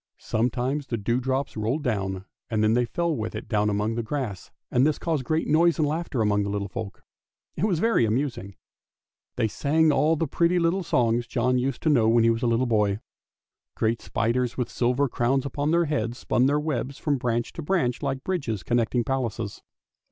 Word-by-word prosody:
Sometimes 125 +5 -1
the 120 - -2
dewdrops 130 +5 -1
rolled 115 +8 -1
down, 95 -6 -2 0.2
and 110 -2 +1
then 110 +1 +3
they 120 +1 +2
fell 170 +5 -1
with 110 -3 -4
it - - -6
down 105 -2 +1
among 105 +2 0
the 115 - -1
grass, 115 -5 -4 0.2
and 125 - +3
this 150 +1 +2
caused 160 -5 -1
great 155 +5 0
noise 165 +2 +4
and 155 -2 +2
laughter 155 -6 -1
among 105 -1 +2
the 100 - -2
little 100 0 -2
folks. 100 0 -7 0.5
It 175 - 0
was 190 -6 +1
very 225 - +3
amusing. 110 -4 -2 0.8
They 115 -3 +1
sang 155 +7 +2
all 150 +3 +3
the 165 - 0
pretty 170 +4 +1
little 175 +2 +2
songs 120 -7 +1
John 125 0 +1
used 130 0 -2
to 160 - +3
know 115 -6 +4
when 115 0 +4
he 115 - +5
was 115 0 -2
a 120 - +1
little 115 +2 +2
boy. 105 -4 +1 0.8
Great 115 +1 0
spiders 120 +2 -1
with 125 - -2
silver 125 +3 +1
crowns 130 +3 0
upon 145 +2 -2
their 170 +1 +3
heads 120 -6 -2
spun 125 0 +2
their 145 +2 +2
webs 140 -3 -3
from 145 -3 -1
branch 120 -2 -1
to 170 - -6
branch 145 -7 0
like 135 -2 -2
bridges 135 - -2
connecting 120 +3 +1
palaces. 115 -5 -3
125 Hz, 195 wpm, -25 LUFS, 115-145 Hz, 0.8 s, he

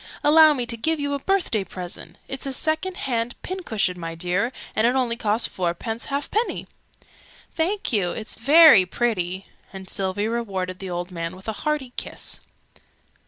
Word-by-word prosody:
"Allow 310 +1 +7
me 250 -3 -1
to 235 0 0
give 315 +7 0
you 285 0 -1
a 280 - -1
birthday 350 - 0
present. 180 -1 -8
It's 270 +1 -2
a - - -2
second 315 +7 -1
hand 240 -2 -2
pincushion, 220 - -2
my 165 -1 -5
dear. 180 +8 0 0.2
And 220 +2 +3
it 245 - +2
only 245 -3 +1
cost 220 0 +1
fourpence 185 +6 -3
halfpenny!" 290 +12 -1 0.9
"Thank 365 0 -1
you, 195 -5 +2
it's 215 +4 -5
very 295 - +8
pretty!" 185 -2 -1 0.3
And 190 -1 -9
Sylvie 195 +2 -1
rewarded 195 -6 -3
the 190 - -6
old 175 +1 -4
man 165 0 -4
with 190 +3 -14
a 220 - -1
hearty 295 -5 -1
kiss. - - -4
230 Hz, 165 wpm, -23 LUFS, 185-285 Hz, 0.9 s, very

